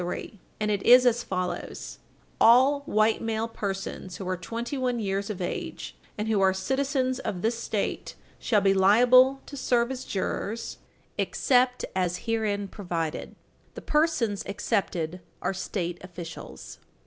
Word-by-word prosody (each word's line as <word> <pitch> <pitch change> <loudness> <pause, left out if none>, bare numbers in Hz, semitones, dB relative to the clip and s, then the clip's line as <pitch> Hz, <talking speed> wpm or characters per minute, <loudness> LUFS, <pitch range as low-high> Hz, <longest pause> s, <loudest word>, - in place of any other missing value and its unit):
102), 180 +3 -5 0.2
and 210 0 0
it 200 -2 0
is 250 +3 +7
as 240 -1 +3
follows: 185 -4 -4 0.4
"All 260 +5 +6
white 215 +1 +2
male 225 0 -1
persons 195 -4 -5
who 190 - -6
are 185 - 0
twenty 230 +8 -5
one 255 -2 0
year 195 -2 0
of 200 -1 -5
age 175 - -5 0.2
and 210 +1 -2
who 215 -3 +2
are 190 0 +4
citizens 260 +5 0
of 180 -8 -4
this 230 +2 +1
State 215 -3 -3 0.2
shall 215 -4 +2
be 195 0 +4
liable 250 +7 +6
to 285 - -9
serve 245 -2 +1
as 260 -1 -5
jurors, 205 +3 -3 0.4
except 250 -1 +2
as 180 -1 -1
herein 215 -3 0
provided." 170 -5 -4 0.4
The - - -7
persons 285 -10 +1
excepted 185 -4 -2 0.2
are - - -1
State 175 -2 -3
officials. 175 -2 -9
210 Hz, 145 wpm, -27 LUFS, 190-245 Hz, 0.4 s, is